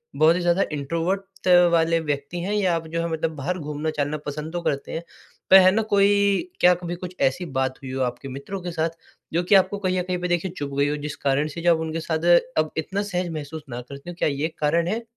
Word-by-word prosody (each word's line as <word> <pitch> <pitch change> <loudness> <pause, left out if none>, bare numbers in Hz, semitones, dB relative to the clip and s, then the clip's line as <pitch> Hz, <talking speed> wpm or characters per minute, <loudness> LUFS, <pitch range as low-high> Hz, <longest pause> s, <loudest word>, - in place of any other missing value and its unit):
बहुत 160 +2 +5
ही 180 - -1
ज़्यादा 175 +2 +3
इंट्रोवर्ट 165 +7 -1 0.3
त 180 - +7 0.2
वाले 165 0 +3
व्यक्ति 145 +2 -3
हैं 200 +4 -2
या 190 -4 +2
आप 165 -1 -3
जो 165 +1 -3
है 170 - -1
मतलब 160 0 -1
बाहर 170 +6 -2
घूमना-चलना 150 0 -2
पसंद 150 +3 -5
तो 175 - -2
करते 140 -4 -2
हैं, 165 - -3 0.5
पर 190 - +10
है 185 0 +6
ना 220 +3 +2
कोई 200 - +3
क्या 180 0 +6
कभी 175 0 -5
कुछ 180 +1 -8
ऐसी 135 +7 +1
बात 130 0 0
हुई 130 - -6
हो 130 0 -2
आपके 125 +2 -4
मित्रों 140 +9 -6
के 175 0 -5
साथ 165 0 0 0.4
जो 175 +1 +1
कि 195 +3 +4
आपको 195 +1 +4
कहीं 185 -2 0
न - - -1
कहीं 180 0 -2
पे 180 - -1
देखिए 175 +1 0
चुभ 140 -1 -4
गई 140 +1 +3
हो 150 - -1
जिस 145 - -5
कारण 140 +2 +2
से 165 +2 -7
जो 175 0 +5
आप 160 - -4
उनके 160 0 -3
साथ 160 +1 -1 0.3
अब 155 0 +2
इतना 195 +5 -2
सहज 180 -3 -2
महसूस 155 0 -6
ना 120 +1 -5
करते 140 +6 -10
हो, 175 - -7
क्या - - +2
ये 145 +3 -1
कारण 165 +3 +2
है? 225 +5 -2
165 Hz, 250 wpm, -24 LUFS, 150-180 Hz, 0.5 s, पर